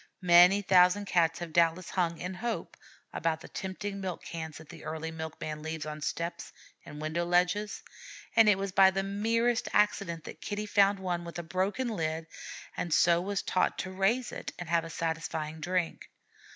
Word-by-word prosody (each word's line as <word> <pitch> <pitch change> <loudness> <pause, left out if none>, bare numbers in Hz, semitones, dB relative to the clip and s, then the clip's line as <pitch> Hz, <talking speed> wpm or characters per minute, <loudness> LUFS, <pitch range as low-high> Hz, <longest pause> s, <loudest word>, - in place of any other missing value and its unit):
Many 180 +3 +7
thousand 185 +2 +5
Cats 165 -3 +2
have 170 -2 -7
doubtless 170 +1 +2
hung, 170 -3 0
in 180 +2 -5
hope, 230 +5 -4 0.4
about 160 -1 -1
the - - -10
tempting 195 +1 -5
milk 185 -2 -4
cans 160 -2 -6
that 160 - -13
the - - -11
early 160 +1 -4
milk 160 -1 -7
man 155 -1 -5
leaves 160 0 -4
on 155 0 -6
steps 170 +3 -4 0.3
and 150 - -10
window 155 +3 -1
ledges, 180 +4 +1 0.5
and 225 -2 +7
it 205 - +5
was 195 0 -3
by 190 0 +7
the 195 0 -1
merest 225 +4 0
accident 200 -6 +1
that - - -10
Kitty 210 0 -3
found 200 -1 +4
one 180 -2 -2
with 170 0 -8
a 175 - -4
broken 190 +9 -1
lid, 160 -6 -2 0.5
and 175 - -3
so 170 +2 +4
was 200 +2 -2
taught 185 - +1
to 185 - -4
raise 205 +6 +1
it - - -6
and 175 - -6
have 170 -1 +2
a - - -7
satisfying 160 -1 -3
drink. 175 +1 -2
175 Hz, 185 wpm, -30 LUFS, 165-195 Hz, 0.5 s, Many